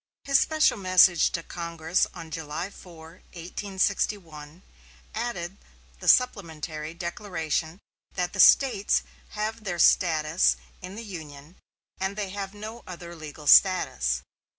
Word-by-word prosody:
His 275 -1 +4
special 310 -7 +2
message 185 -2 +5
to 165 - -3
Congress 170 0 -1
on 160 -1 -9
July 160 +4 -5
4, 165 -2 -14
1861, 180 -3 -3 0.5
added 200 -5 -4 0.4
the - - -8
supplementary 160 - +1
declaration 170 -2 -3 0.4
that 180 -1 -2
"the 195 - -7
States 245 -2 +5 0.3
have 215 +1 -3
their 180 -4 -3
status 160 -1 +3 0.3
in 185 +2 -8
the 230 - -7
Union, 155 -4 -10 0.4
and 190 +1 -2
they 205 -2 -3
have 195 +1 -6
no 220 +3 -8
other 175 -1 -9
legal 155 -1 -10
status." 135 - +4
180 Hz, 120 wpm, -26 LUFS, 160-200 Hz, 0.5 s, message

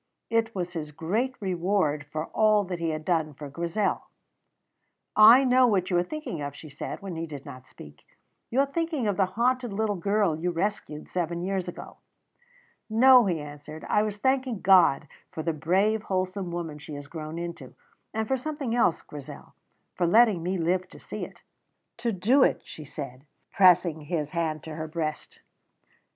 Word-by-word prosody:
It 230 -1 +1
was 175 -2 -3
his 155 -3 -4
great 205 - -2
reward 175 -6 0
for 155 +1 -3
all 215 -1 +4
that 180 -2 -5
he 165 -1 -1
had 155 0 -4
done 160 -4 0
for 145 0 -8
Grizel. 170 +7 -1 1.1
"I 225 +5 +9
know 255 -1 +5
what 190 -4 +1
you 175 - +3
are - - +3
thinking 180 - -5
of," 145 -1 -5
she 155 - -11
said, 145 +7 -7
when 190 -3 -5
he 165 0 -4
did 145 -3 -9
not 130 0 -10
speak. 75 0 -14 0.5
"You 260 +4 +3
are - - +3
thinking 310 -4 -2
of 205 - +1
the 195 -1 +2
haunted 250 0 +1
little 210 +1 0
girl 200 -2 +1
you 170 +3 -2
rescued 170 -4 -3
seven 175 -1 -2
years 190 -1 -2
ago." 175 - -8 0.9
"No," 245 +1 +7
he 170 -4 0
answered; 150 +1 -9
"I 210 - +3
was 210 -1 -2
thanking 260 -2 0
God 180 -7 +5 0.2
for 160 - -6
the 165 - 0
brave, 195 +8 +1
wholesome 185 -2 -2
woman 165 -3 -5
she 150 0 -8
has 145 0 -7
grown 155 +1 -7
into; 170 -6 -7 0.4
and 220 0 -2
for 265 - +1
something 280 -3 -4
else, 235 -8 +2
Grizel 145 -2 -10 0.4
for 175 - 0
letting 215 -1 +5
me 185 +3 -1
live 180 +2 0
to - - -14
see - - -6
it." - - -16 0.6
"To 235 0 -1
do 220 +8 +3
it," - - +3
she 155 - -10
said, 135 -2 -8 0.3
pressing 180 -4 +4
his 150 -1 -3
hand 160 -4 -2
to 160 - -7
her 155 0 -5
breast. 155 -1 -5
180 Hz, 180 wpm, -27 LUFS, 155-215 Hz, 1.1 s, I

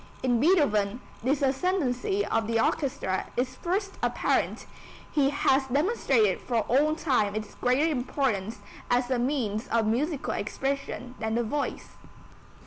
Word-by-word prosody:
In 245 -2 +2
Beethoven 245 - +3 0.2
this 275 +4 0
ascendency 265 - 0
of 225 +1 0
the 230 0 +1
orchestra 225 -7 0
is 255 +1 -1
first 385 +7 -2
apparent; - - 0 0.5
he 280 -2 +3
has 270 -1 +2
demonstrated 265 - +2
for 235 -3 0
all 290 +8 +2
time 250 -10 +1
its 215 -1 -5
greater 255 +5 +2
importance 245 -7 -1 0.3
as 245 +1 +1
a 250 - +2
means 240 -4 -1
of 230 -1 +1
musical 275 +7 -1
expression 260 +2 -3
than 220 0 -1
the 240 - +1
voice. 280 +6 -3
255 Hz, 135 wpm, -27 LUFS, 225-285 Hz, 0.5 s, Beethoven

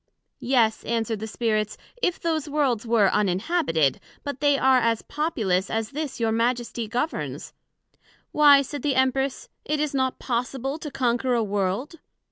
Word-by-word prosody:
Yes, 235 -4 +2
answered 225 -2 -1
the 220 - -5
Spirits, 215 -2 -1 0.2
if 360 -5 0
those 315 -3 -1
Worlds 265 -6 0
were 220 -4 +4
uninhabited; 195 - +1 0.2
but 285 -2 -5
they 285 0 +3
are 265 -1 +4
as 230 -2 0
populous 215 - -1
as 225 0 -2
this 295 -2 -4
your 225 -1 +1
Majesty 235 0 -1
governs. 250 +9 -3 0.8
Why, 285 -2 +6
said 285 +2 -6
the 285 -3 0
Empress, 265 +1 0 0.2
it 300 0 -1
is 300 -1 -1
not 260 -1 0
possible 265 +3 -3
to 305 - -6
conquer 250 -1 0
a 230 - +1
World. 205 - -2
250 Hz, 150 wpm, -25 LUFS, 225-285 Hz, 0.8 s, Why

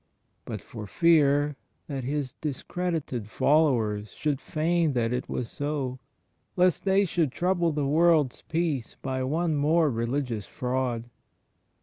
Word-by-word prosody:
but - - -5
for 110 -3 -8
fear 145 - +3 0.3
that 135 -3 -4
His 140 0 -2
discredited 150 - -3
followers 115 -9 +2
should 145 -3 -1
feign 160 0 +1
that 120 -1 0
it 125 - -3
was 125 - -2
so, 140 -2 -3 0.3
— - - -46
lest 180 0 +3
they 195 +1 +4
shoidd 170 -5 +1
trouble 175 0 +1
the 145 -2 -1
world's 155 -2 +3
peace 160 -7 -2
by 130 -1 -2
one 160 +4 0
more 155 +1 +3
religious 115 -2 -2
fraud. 125 -2 -2
145 Hz, 130 wpm, -27 LUFS, 125-165 Hz, 0.3 s, they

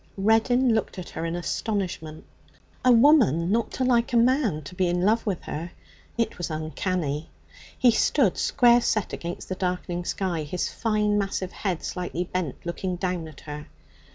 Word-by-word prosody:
Reddin 225 +5 +3
looked 220 - -1
at 180 - -6
her 160 - -4
in 165 +1 -2
astonishment. 175 -4 -3 0.6
A 255 - +6
woman 230 - +5
not 230 0 +1
to 260 - -1
like 245 -1 +2
a - - +4
man 235 - +2
to 145 - -9
be 180 0 +1
in 175 0 0
love 220 +3 +2
with 190 -4 -2
her. 165 +3 -5 0.4
It 230 -5 -1
was 175 - -3
uncanny. 155 -1 -2 0.5
He 245 - +5
stood 225 -2 +2
square 240 -1 +4
set 215 -3 0
against 170 +1 -5
the - - -3
darkening 180 -1 -2
sky, 180 -4 -1
his 155 +4 -3
fine 210 -2 +1
massive 195 -2 -2
head 185 -5 -3
slightly 180 -1 -3
bent, 180 -5 -3
looking 180 +2 -3
down 180 -2 -2
at 155 -3 -13
her. 150 0 -8
185 Hz, 170 wpm, -25 LUFS, 170-225 Hz, 0.6 s, A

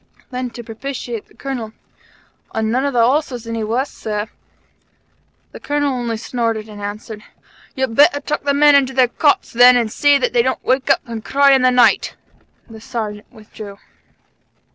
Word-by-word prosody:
Then, 250 0 -4
to 240 - -7
propitiate 235 0 -6
the - - -24
Colonel: 245 -6 -6 0.8
"An' 220 0 -1
none 260 +3 0
of 280 - -3
the 235 -2 +4
horses 255 -3 -1
any 230 0 -4
the 215 - -3
worse, 250 +5 -1
Sir." 210 0 -4 1.2
The - - -11
Colonel 290 -1 -1
only 240 -3 -3
snorted 230 -2 -3
and 210 -1 -11
answered: 210 +1 -7 0.5
"You'd 265 -3 -2
better 285 +3 +4
tuck 300 - -3
the 280 0 0
men 295 0 +6
into 270 -2 +3
their 255 -2 +3
cots, 290 +3 +1
then, 245 +1 +7
and 230 -3 -1
see 290 +3 +3
that 260 - -1
they 240 - +4
don't 260 +2 -2
wake 260 +2 0
up 275 - +3
and 230 -2 -7
cry 280 +2 +3
in 265 -1 +4
the 255 - +4
night." 250 -2 +3 0.5
The 220 -1 -12
Sergeant 215 -4 -6
withdrew. 215 -2 -11
245 Hz, 180 wpm, -18 LUFS, 220-270 Hz, 1.2 s, then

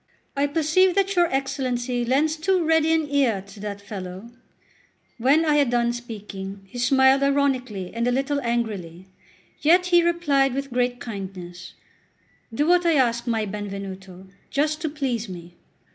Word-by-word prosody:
I 280 +1 +1
perceive 330 +5 +2
that 395 0 +1
your 350 -1 +4
Excellency 260 -3 -2
lends 285 +6 +1
too 345 +2 +1
ready 320 0 +3
an 320 -2 +1
ear 275 -8 +1
to 200 +1 -14
that 205 -1 -5
fellow." 195 +1 -8 0.9
When 280 +7 +3
I 300 -1 +3
had 285 -4 +3
done 240 0 +1
speaking, 205 -4 -7
he 220 +6 -9
smiled 265 +2 +4
ironically 260 -9 0
and 235 +1 -1
a - - +2
little 275 +3 0
angrily; 210 -8 -3 0.6
yet 350 +4 +4
he 345 - +7
replied 295 -6 +1
with 275 -2 -4
great 245 0 0
kindness: 185 -5 -8 0.8
"Do 285 +6 0
what 355 +2 +4
I 335 -2 +3
ask, 235 -3 +1
my 225 -2 0
Benvenuto, 195 -2 -7 0.2
just 305 +2 0
to 315 - -1
please 255 -7 -3
me." 175 -1 -9
250 Hz, 155 wpm, -24 LUFS, 205-295 Hz, 0.9 s, he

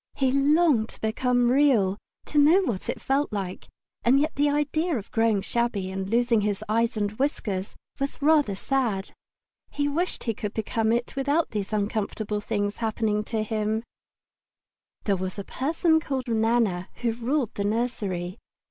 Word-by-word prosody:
He 265 -2 +2
longed 275 -3 +3
to - - -14
become 245 +2 +2
Real, 240 -8 +3 0.3
to 295 - +1
know 325 +7 +6
what 225 - -2
it - - -2
felt 275 +2 0
like; 195 -3 -4 0.4
and 260 +3 +5
yet 305 +2 0
the 290 +1 +2
idea 295 +2 0
of 205 - -8
growing 225 -3 +2
shabby 230 -6 -1
and 190 0 -4
losing 235 0 +3
his 205 0 -1
eyes 230 +2 +1
and 205 -1 0
whiskers 205 -8 -2 0.2
was 275 0 -3
rather 290 -8 +3
sad. 220 -4 -1 0.6
He 290 0 -1
wished 335 +6 -1
that - - -11
he 230 - 0
could 210 0 -5
become 220 0 0
it 240 +2 -1
without 285 +4 +1
these 205 -2 -3
uncomfortable 210 0 -2
things 205 0 -2
happening 220 -2 0
to 220 -1 -1
him. 215 0 -1 1.2
There 200 - +2
was 185 +1 -4
a 200 - -4
person 320 - +1
called 270 -4 -3
Nana 220 -5 +1
who 235 - +2
ruled 240 +2 -1
the 200 - -2
nursery. 200 -5 -2
230 Hz, 165 wpm, -26 LUFS, 205-275 Hz, 1.2 s, know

